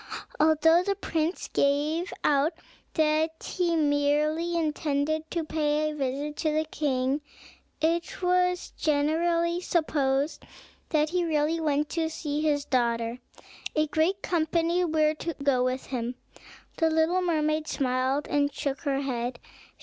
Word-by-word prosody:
Although 320 +2 +5
the 395 +2 -1
prince 325 0 -2
gave 300 +6 +1
out 290 +3 +3 0.4
that 315 0 +1
he 345 -2 0
merely 300 +3 +1
intended 310 0 -1
to 335 -2 -2
pay 305 -1 0
a - - -7
visit 285 +2 -3
to 310 -1 0
the 310 +1 0
king, 275 -2 -1 0.6
it 335 +2 0
was 360 0 +1
generally 335 +3 +1
supposed 290 -4 0 0.5
that 305 -1 +2
he 360 0 +1
really 315 0 +1
went 300 -2 +1
to 325 -1 -1
see 300 -2 -3
his 290 -2 +1
daughter. 235 -1 0 0.6
A 305 0 +3
great 315 +6 0
company 335 +1 +1
were 310 -2 +2
to 330 +1 -5
go 275 -3 +1
with 255 +1 -1
him. 245 -1 -3 0.6
The 325 -1 +3
little 320 +3 +2
mermaid 310 -3 0
smiled, 260 +1 0
and 285 0 +1
shook 280 -1 -3
her 275 -3 0
head. 245 -2 -3
310 Hz, 135 wpm, -27 LUFS, 285-330 Hz, 0.6 s, Although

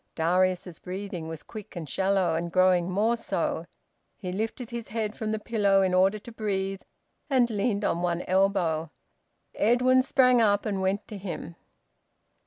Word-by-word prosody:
Darius's 180 +1 +1
breathing 185 -2 -6
was 160 -1 -7
quick 215 -4 -10
and 165 -3 -5
shallow, 190 +2 +1
and 170 +1 -2
growing 185 -1 +3
more 215 +5 +2
so. 230 - -2 0.5
He 185 -4 -5
lifted 225 +5 -4
his 235 -1 -5
head 215 -1 -3
from 215 -1 -3
the 220 - 0
pillow 205 -3 +2
in 185 -1 +1
order 190 +3 +4
to 225 +3 -11
breathe, 195 -3 -2 0.5
and 255 -4 +4
leaned 205 -1 0
on 170 - 0
one 175 0 -1
elbow. 180 -4 +1 0.6
Edwin 250 +3 +4
sprang 255 -2 +4
up 205 -2 +3
and 200 -3 -1
went 195 +2 -1
to 210 - -7
him. 180 -3 -6
195 Hz, 160 wpm, -27 LUFS, 180-220 Hz, 0.6 s, order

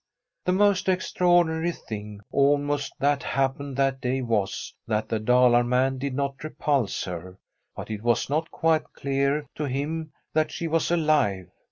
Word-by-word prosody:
The 180 - +2
most 195 -1 +3
extraordinary 175 -2 +2
thing, 105 -7 -8
almost, 145 +1 +2
that 145 0 +2
happened 135 0 -1
that 135 -1 +1
day 130 +1 -1
was, 110 -5 -1
that 110 0 -1
the 110 - 0
Dalar 125 +1 +4
man 130 +2 +1
did 135 -1 -3
not 140 0 -2
repulse 145 -6 -1
her. 90 +1 -7 0.4
But - - -7
it 105 -1 -4
was 120 0 +1
not 155 +4 -1
quite 160 -1 0
clear 140 +2 0
to 150 - -3
him 150 +4 -3 0.2
that 155 0 +2
she 170 - -3
was 165 0 +1
alive. 150 - +1
140 Hz, 155 wpm, -26 LUFS, 120-155 Hz, 0.4 s, Dalar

